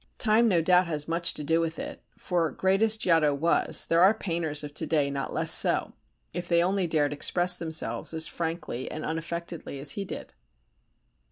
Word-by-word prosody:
Time 225 +2 +3
no 175 -6 +2
doubt 180 +1 +3
has 150 -3 -2
much 170 +1 +1
to 150 - -5
do 165 +3 +1
with 165 0 -3
it, - - -7 0.2
for, 170 -3 -1
great 190 +4 0
as 220 -1 +3
Giotto 165 -7 +2
was, 165 +4 +2
there 165 +1 +2
are 195 +4 +6
painters 165 -7 -2
of 145 -1 -8
to 160 - -2
day 145 -3 +1
not 140 -1 -4
less - - +1
so, - - +3 0.4
if 175 +1 -5
they 170 -1 +3
only 190 0 0
dared 150 -3 0
express 175 +4 +2
themselves 160 -2 -1
as 160 -1 +1
frankly 165 -8 -4
and 155 - -6
unaffectedly 165 -1 -5
as 140 +1 0
he 200 - -4
did. 195 - -8
165 Hz, 190 wpm, -27 LUFS, 155-180 Hz, 0.4 s, are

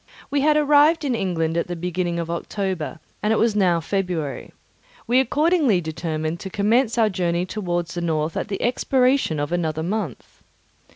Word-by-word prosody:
We 285 -1 +1
had 300 +1 +4
arrived 300 +2 +4
in 265 - +1
England 170 -6 -1
at 170 - 0
the 175 - -4
beginning 175 0 -2
of 170 0 -3
October, 175 -2 -3 0.2
and 210 - +1
it 220 - +3
was 225 -2 +2
now 180 -5 +3
February. 175 -5 -3 0.5
We 245 +2 +3
accordingly 290 - +2
determined 160 0 -3
to 190 - -6
commence 225 +5 +1
our 225 -2 +4
journey 175 -3 -1
towards 175 -4 -3
the 175 - -3
north 160 -1 -1
at - - -2
the 200 -2 -4
expiration 250 - +2
of 145 +1 -2
another 160 -3 -1
month. 185 - -4
185 Hz, 170 wpm, -22 LUFS, 170-235 Hz, 0.5 s, had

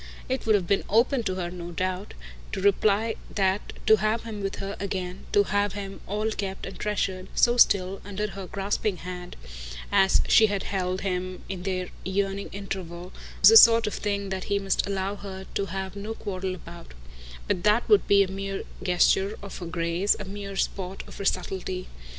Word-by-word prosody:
It 260 -2 -2
would 220 - +5
have 190 -3 +1
been 195 +3 +1
open 235 +5 +3
to 185 - 0
her, 175 -2 -3
no 175 -1 -7
doubt, 185 +2 -3 0.4
to - - -2
reply 205 +3 +2 0.2
that 195 0 +1
to 220 0 +7
have 215 +2 0
him 220 -3 -6
with 195 0 -2
her 195 +1 -5
again, 185 -2 -4
to 205 - +5
have 205 0 0
him 195 -1 -6
all 210 +3 -1
kept 195 -2 -4
and 195 - -8
treasured, 190 -3 -1
so 240 0 +4
still, 195 -5 +4
under 205 +1 -3
her 195 0 -7
grasping 200 +1 -1
hand, 180 0 -7 0.6
as 190 0 +4
she 220 - +7
had 200 -2 -2
held 185 -1 -2
him 185 -1 -3
in 190 -2 -5
their 185 -1 -2
yearning 195 +1 -1
interval, 185 -3 -6 0.3
was - - +10
a 450 - +10
sort 230 - +8
of 210 - -2
thing 200 -1 -2
that 190 -1 -3
he 200 - +1
must 195 0 0
allow 195 0 -2
her 190 -1 -8
to 200 - -1
have 190 +2 -4
no 210 +3 -5
quarrel 190 -2 -4
about; 170 - -12 0.5
but 175 - 0
that 210 +3 +3
would 420 - +5
be 200 0 +6
a - - -3
mere 195 +1 -4 0.2
gesture 190 +3 +2
of 200 - -7
her 175 - -6
grace, 170 +3 +1
a 205 - -5
mere 200 0 -6
sport 190 -1 -2
of - - -12
her 200 - -4
subtlety. 185 0 -2
195 Hz, 190 wpm, -26 LUFS, 185-205 Hz, 0.6 s, was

